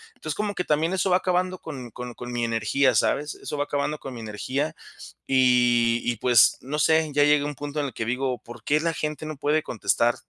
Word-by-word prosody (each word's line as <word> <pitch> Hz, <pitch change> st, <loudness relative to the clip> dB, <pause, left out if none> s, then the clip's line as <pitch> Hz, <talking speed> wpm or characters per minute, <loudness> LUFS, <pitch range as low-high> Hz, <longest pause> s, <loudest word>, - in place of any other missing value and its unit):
Entonces, 155 Hz, -, -5 dB
como 205 Hz, -1 st, -2 dB
que 180 Hz, -, -1 dB
también 160 Hz, +3 st, +1 dB
eso 190 Hz, +1 st, +1 dB
va 180 Hz, -, +6 dB
acabando 185 Hz, 0 st, -1 dB
con 130 Hz, -7 st, -8 dB
con 125 Hz, +2 st, -7 dB
con 120 Hz, 0 st, -7 dB
mi 120 Hz, -1 st, -2 dB
energía, 115 Hz, +3 st, +1 dB
¿sabes? 145 Hz, +7 st, +1 dB
Eso 150 Hz, -, -6 dB
va 145 Hz, -, 0 dB
acabando 145 Hz, +1 st, -2 dB
con 135 Hz, -, -8 dB
mi 115 Hz, -, -7 dB
energía. 130 Hz, +7 st, -3 dB, 0.5 s
Y 120 Hz, -2 st, +3 dB
y 120 Hz, -2 st, -1 dB
pues, 120 Hz, 0 st, +5 dB
no 145 Hz, +3 st, -4 dB
sé, 160 Hz, +1 st, +3 dB
ya 145 Hz, 0 st, +4 dB
llegué 150 Hz, 0 st, +4 dB
a -, -, -3 dB
un 145 Hz, -1 st, -4 dB
punto 145 Hz, +2 st, -5 dB
en 145 Hz, -, -1 dB
el 125 Hz, -, -8 dB
que 115 Hz, -, -4 dB
digo: 125 Hz, +1 st, -1 dB
"¿Por 120 Hz, -, -12 dB
qué 150 Hz, +1 st, +2 dB
la 165 Hz, 0 st, 0 dB
gente 155 Hz, 0 st, -4 dB
no 155 Hz, -2 st, -6 dB
puede 150 Hz, +2 st, +1 dB
contestar 115 Hz, 0 st, +1 dB
140 Hz, 235 wpm, -25 LUFS, 120-155 Hz, 0.5 s, va